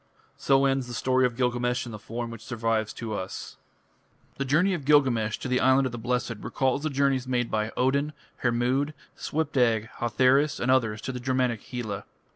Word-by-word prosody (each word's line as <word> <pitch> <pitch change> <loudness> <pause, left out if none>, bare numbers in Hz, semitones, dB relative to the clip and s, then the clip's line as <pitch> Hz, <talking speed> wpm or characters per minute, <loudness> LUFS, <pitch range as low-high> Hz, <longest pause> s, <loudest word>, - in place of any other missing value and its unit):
So 135 0 +3
ends 135 -2 +1
the 120 - -6
story 130 +3 +3
of 120 -1 -9
Gilgamesh 125 -1 0
in 120 - -7
the 105 - -7
form 115 +2 -5
which 115 -2 -9
survives 115 -2 -1
to 115 -2 -5
us. 95 -2 -6 0.8
The 140 - -1
journey 170 +8 +3
of 170 -6 -3
Gilgamesh 130 -7 +3
to - - -5
the 125 0 +1
Island 130 +1 +4
of 130 - -2
the 120 - -6
Blessed 125 0 -1
recalls 130 +1 0
the 155 - -1
journeys 135 -2 +1
made 125 -2 0
by 110 +1 -1
Odin, 140 +4 +1 0.2
Hermod, 125 +5 0 0.2
Svipdag, 125 -8 0
Hotherus 130 +5 +3
and 130 - +1
others 110 -5 +2
to 130 - -4
the 125 - -5
Germanic 125 -3 0
Hela. 110 -5 -5
125 Hz, 185 wpm, -27 LUFS, 115-135 Hz, 0.8 s, Island